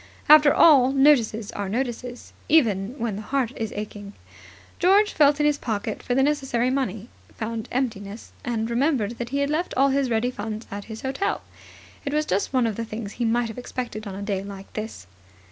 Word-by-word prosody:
After 300 Hz, -1 st, +8 dB
all 270 Hz, -5 st, +6 dB
notices 245 Hz, -7 st, +3 dB
are 200 Hz, -1 st, -4 dB
notices, 245 Hz, +1 st, -4 dB, 0.2 s
even 225 Hz, -7 st, +3 dB
when 225 Hz, -4 st, -2 dB
the -, -, -5 dB
heart 255 Hz, +1 st, -1 dB
is 220 Hz, -2 st, -4 dB
aching. 205 Hz, -1 st, -7 dB, 0.7 s
George 400 Hz, +4 st, +4 dB
felt 290 Hz, -1 st, +4 dB
in 295 Hz, -, +2 dB
his 295 Hz, -1 st, +2 dB
pocket 215 Hz, -2 st, -3 dB
for 245 Hz, -, -2 dB
the 270 Hz, -, +4 dB
necessary 270 Hz, -4 st, +1 dB
money, 245 Hz, -5 st, -2 dB, 0.3 s
found 225 Hz, 0 st, -4 dB
emptiness, 220 Hz, -5 st, -3 dB
and 225 Hz, -2 st, -2 dB
remembered 240 Hz, -2 st, 0 dB
that 240 Hz, -1 st, -4 dB
he 280 Hz, -, -2 dB
had 280 Hz, +1 st, 0 dB
left 335 Hz, +4 st, -1 dB
all 275 Hz, +1 st, +4 dB
his 270 Hz, -1 st, +1 dB
ready 235 Hz, +2 st, +1 dB
funds 220 Hz, -1 st, -5 dB
at 200 Hz, 0 st, -6 dB
his 220 Hz, -1 st, -9 dB
hotel. 270 Hz, +9 st, -1 dB, 0.6 s
It 285 Hz, +1 st, -2 dB
was 305 Hz, 0 st, +1 dB
just 195 Hz, -4 st, -1 dB
one 255 Hz, -3 st, +2 dB
of 220 Hz, -3 st, -2 dB
the 230 Hz, -, -2 dB
things 215 Hz, -2 st, -6 dB
he 240 Hz, -, -3 dB
might 235 Hz, +1 st, +1 dB
have 225 Hz, -, -7 dB
expected 240 Hz, -4 st, -5 dB
on 195 Hz, -, -6 dB
a 200 Hz, -, -6 dB
day 200 Hz, -2 st, -2 dB
like 195 Hz, -1 st, -10 dB
this. 215 Hz, -, -6 dB
235 Hz, 195 wpm, -24 LUFS, 215-275 Hz, 0.7 s, After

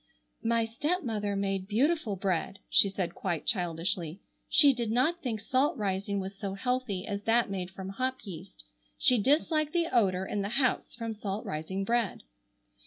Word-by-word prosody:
"My 230 Hz, 0 st, +2 dB
stepmother 225 Hz, -, -1 dB
made 195 Hz, -1 st, -1 dB
beautiful 250 Hz, +1 st, +1 dB
bread," 190 Hz, 0 st, -1 dB
she 200 Hz, -, +6 dB
said 190 Hz, -3 st, -3 dB
quite 175 Hz, -5 st, -3 dB
childishly; 175 Hz, -3 st, -1 dB, 0.3 s
"she 285 Hz, -2 st, +7 dB
did 240 Hz, -3 st, -2 dB
not 270 Hz, +10 st, +2 dB
think 235 Hz, -7 st, -2 dB
salt 265 Hz, +7 st, +1 dB
rising 200 Hz, -1 st, -1 dB
was 190 Hz, +1 st, -5 dB
so 195 Hz, 0 st, -4 dB
healthy 240 Hz, -4 st, -2 dB
as 200 Hz, -2 st, -3 dB
that 225 Hz, -2 st, +3 dB
made 185 Hz, -2 st, -3 dB
from 190 Hz, 0 st, -7 dB
hop 255 Hz, +6 st, -1 dB
yeast. 185 Hz, -, -9 dB, 0.3 s
She 250 Hz, -2 st, +5 dB
disliked 305 Hz, +4 st, +2 dB
the 340 Hz, -5 st, 0 dB
odor 190 Hz, -5 st, +3 dB
in 205 Hz, -, -2 dB
the 200 Hz, -, -2 dB
house 260 Hz, -2 st, +1 dB
from 230 Hz, -1 st, -4 dB
salt 205 Hz, -1 st, -4 dB
rising 160 Hz, +6 st, -3 dB
bread." 230 Hz, 0 st, 0 dB
205 Hz, 165 wpm, -30 LUFS, 190-250 Hz, 0.3 s, she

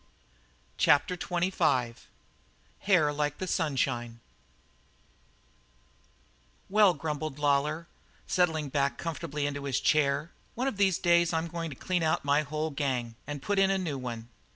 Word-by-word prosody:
CHAPTER 145 Hz, +5 st, +4 dB
XXV 170 Hz, -9 st, 0 dB, 0.9 s
HAIR 165 Hz, -7 st, +3 dB
LIKE 150 Hz, 0 st, -1 dB
THE 185 Hz, -, -3 dB
SUNSHINE 130 Hz, -8 st, -1 dB, 2.5 s
"Well," 205 Hz, -4 st, +5 dB
grumbled 150 Hz, -1 st, -4 dB
Lawlor, 150 Hz, +3 st, +1 dB, 0.4 s
settling 160 Hz, -5 st, +1 dB
back 140 Hz, 0 st, 0 dB
comfortably 165 Hz, -3 st, -3 dB
into 145 Hz, -1 st, -3 dB
his 135 Hz, -5 st, 0 dB
chair, 150 Hz, +1 st, +1 dB, 0.2 s
"one 255 Hz, +3 st, -1 dB
of 265 Hz, -, -2 dB
these 195 Hz, -3 st, +3 dB
days 170 Hz, -1 st, +3 dB
I'm 160 Hz, 0 st, 0 dB
goin' 165 Hz, 0 st, -4 dB
to 140 Hz, -, -8 dB
clean 180 Hz, +6 st, -1 dB
out 160 Hz, -2 st, 0 dB
my 145 Hz, +1 st, +3 dB
whole 155 Hz, +1 st, -3 dB
gang 130 Hz, -5 st, -2 dB
and 145 Hz, -2 st, -5 dB
put 205 Hz, -1 st, 0 dB
in 195 Hz, 0 st, +4 dB
a 195 Hz, -, +2 dB
new 160 Hz, -8 st, -3 dB
one. 120 Hz, -2 st, -6 dB
150 Hz, 135 wpm, -29 LUFS, 140-170 Hz, 2.5 s, Well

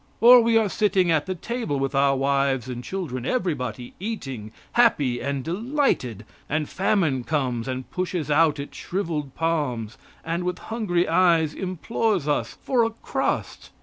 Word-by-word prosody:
Or 245 Hz, +1 st, +9 dB
we 230 Hz, 0 st, +3 dB
are 220 Hz, -2 st, +3 dB
sitting 190 Hz, -3 st, +2 dB
at 155 Hz, 0 st, +1 dB
the 185 Hz, -, -2 dB
table 225 Hz, -, -3 dB
with 135 Hz, +1 st, -1 dB
our 140 Hz, 0 st, +3 dB
wives 135 Hz, -2 st, +1 dB
and 125 Hz, -1 st, -5 dB
children, 145 Hz, -8 st, -4 dB
everybody 125 Hz, -, -2 dB
eating, 135 Hz, -, -5 dB, 0.2 s
happy 145 Hz, -, +3 dB
and 140 Hz, 0 st, -2 dB
delighted; 180 Hz, -, -1 dB, 0.2 s
and 150 Hz, 0 st, 0 dB
Famine 175 Hz, -, +1 dB
comes 125 Hz, -5 st, -1 dB
and 130 Hz, 0 st, -4 dB
pushes 180 Hz, -4 st, -2 dB
out 150 Hz, -1 st, +4 dB
its 140 Hz, -, -7 dB
shriveled 165 Hz, -7 st, -3 dB
palms, 145 Hz, -10 st, -1 dB, 0.3 s
and, 170 Hz, +2 st, -2 dB
with 180 Hz, 0 st, -2 dB
hungry 200 Hz, -7 st, -1 dB
eyes, 165 Hz, -3 st, +3 dB
implores 190 Hz, -1 st, -1 dB
us 145 Hz, -, -1 dB
for 250 Hz, -3 st, +2 dB
a 225 Hz, -, +1 dB
crust. 225 Hz, -, -3 dB
160 Hz, 150 wpm, -24 LUFS, 135-195 Hz, 0.3 s, Or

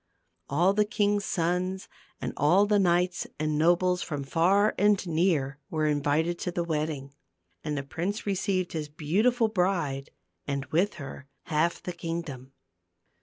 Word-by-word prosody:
All 175 Hz, +7 st, +3 dB
the 210 Hz, +1 st, +3 dB
king's 205 Hz, -2 st, 0 dB
sons, 180 Hz, +2 st, -1 dB, 0.3 s
and -, -, -4 dB
all 175 Hz, +8 st, +4 dB
the 205 Hz, 0 st, +3 dB
knights 180 Hz, -1 st, +2 dB
and 155 Hz, 0 st, -1 dB
nobles 175 Hz, +3 st, +3 dB
from 145 Hz, -3 st, -4 dB
far 185 Hz, +9 st, +3 dB
and 205 Hz, -1 st, +3 dB
near, 160 Hz, -5 st, +1 dB
were 155 Hz, -1 st, 0 dB
invited 150 Hz, +3 st, +1 dB
to 180 Hz, -, -2 dB
the 175 Hz, 0 st, -1 dB
wedding. 150 Hz, -4 st, -3 dB, 0.5 s
And 150 Hz, -1 st, -2 dB
the 135 Hz, -, -2 dB
prince 180 Hz, +9 st, -3 dB
received 190 Hz, -2 st, -1 dB
his 155 Hz, -2 st, -3 dB
beautiful 215 Hz, -, +2 dB
bride 180 Hz, -9 st, -1 dB, 0.4 s
and 140 Hz, -1 st, -2 dB
with 185 Hz, +6 st, +2 dB
her 140 Hz, -2 st, -9 dB, 0.2 s
half 160 Hz, +2 st, 0 dB
the 180 Hz, -, -4 dB
kingdom. 165 Hz, -6 st, -5 dB
170 Hz, 145 wpm, -28 LUFS, 150-190 Hz, 0.5 s, all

